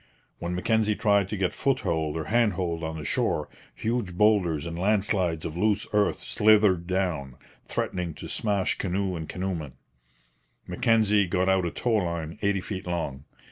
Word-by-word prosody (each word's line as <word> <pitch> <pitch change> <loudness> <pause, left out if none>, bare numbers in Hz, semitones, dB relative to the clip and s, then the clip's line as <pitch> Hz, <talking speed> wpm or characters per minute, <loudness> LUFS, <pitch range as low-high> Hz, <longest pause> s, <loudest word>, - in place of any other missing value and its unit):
When 85 +1 -3
Mackenzie 110 +3 +1
tried 100 -3 +2
to 105 - -3
get 95 -2 0
foothold 80 - 0
or 80 - -2
handhold 90 -5 0
on 80 0 -3
the 75 - -7
shore, 75 +2 0 0.3
huge 110 - -2
boulders 90 -8 +3
and 85 0 -5
land 100 +2 +2
slides 90 -7 0
of 80 - -4
loose 105 +3 +1
earth 105 -1 +3
slithered 105 -5 +3
down, 90 -9 -1 0.3
threatening 90 -4 -3
to - - -8
smash 100 -4 0
canoe 95 0 -1
and 80 -2 -6
canoemen. 90 -7 -4 0.9
Mackenzie 105 0 +2
got 95 +1 +1
out 95 -2 +3
a - - 0
tow 120 - -1
line 85 -5 -1
eighty 100 -2 +1
feet 95 -1 -6
long. 75 -6 -3
95 Hz, 160 wpm, -26 LUFS, 85-105 Hz, 0.9 s, boulders